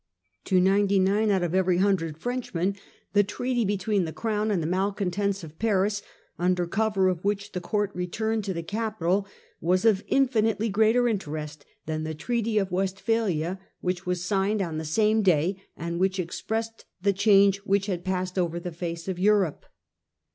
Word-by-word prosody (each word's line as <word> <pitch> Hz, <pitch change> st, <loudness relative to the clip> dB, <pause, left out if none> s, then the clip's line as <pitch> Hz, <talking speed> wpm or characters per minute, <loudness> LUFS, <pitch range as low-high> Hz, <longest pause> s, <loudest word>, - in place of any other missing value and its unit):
To 185 Hz, -, +3 dB
ninety 195 Hz, +2 st, +3 dB
nine 200 Hz, +3 st, +3 dB
out 190 Hz, -3 st, +2 dB
of 175 Hz, -1 st, -1 dB
every 185 Hz, -1 st, +3 dB
hundred 180 Hz, -5 st, +1 dB
Frenchmen 200 Hz, -5 st, -2 dB, 0.4 s
the 205 Hz, 0 st, +5 dB
treaty 245 Hz, +4 st, -1 dB
between 200 Hz, -1 st, 0 dB
the 160 Hz, -, -4 dB
Crown 215 Hz, +2 st, -1 dB
and 200 Hz, -4 st, +1 dB
the 160 Hz, -, -2 dB
malcontents 195 Hz, +1 st, -1 dB
of 160 Hz, 0 st, -11 dB
Paris, 205 Hz, -2 st, +1 dB, 0.4 s
under 180 Hz, 0 st, +1 dB
cover 195 Hz, +1 st, +1 dB
of 180 Hz, -2 st, -1 dB
which 205 Hz, 0 st, -1 dB
the 180 Hz, -, -4 dB
court 205 Hz, +2 st, -1 dB
returned 215 Hz, +5 st, -2 dB
to 195 Hz, -, -2 dB
the 170 Hz, -, -3 dB
capital, 200 Hz, -1 st, -1 dB, 0.3 s
was 185 Hz, +5 st, +1 dB
of 210 Hz, -2 st, +4 dB
infinitely 225 Hz, -5 st, +2 dB
greater 220 Hz, +4 st, +3 dB
interest 155 Hz, -8 st, -4 dB, 0.2 s
than 155 Hz, 0 st, -2 dB
the 160 Hz, 0 st, -4 dB
Treaty 230 Hz, +5 st, -1 dB
of 195 Hz, -2 st, +1 dB
West 190 Hz, +1 st, -1 dB
phalia, 190 Hz, -6 st, 0 dB, 0.2 s
which 180 Hz, 0 st, -2 dB
was 180 Hz, -1 st, -1 dB
signed 200 Hz, +2 st, +1 dB
on 165 Hz, -5 st, -2 dB
the 160 Hz, -, -5 dB
same 215 Hz, +7 st, +2 dB
day, 185 Hz, 0 st, +2 dB, 0.2 s
and 170 Hz, +1 st, -3 dB
which 190 Hz, 0 st, +1 dB
expressed 225 Hz, +6 st, -3 dB, 0.2 s
the 200 Hz, 0 st, +3 dB
change 200 Hz, 0 st, +5 dB
which 200 Hz, 0 st, 0 dB
had 180 Hz, -4 st, -3 dB
passed 185 Hz, 0 st, -2 dB
over 170 Hz, -1 st, 0 dB
the 175 Hz, +1 st, -5 dB
face 170 Hz, 0 st, -5 dB
of 185 Hz, -2 st, -3 dB
Europe. 195 Hz, -5 st, +2 dB
195 Hz, 175 wpm, -26 LUFS, 180-210 Hz, 0.4 s, the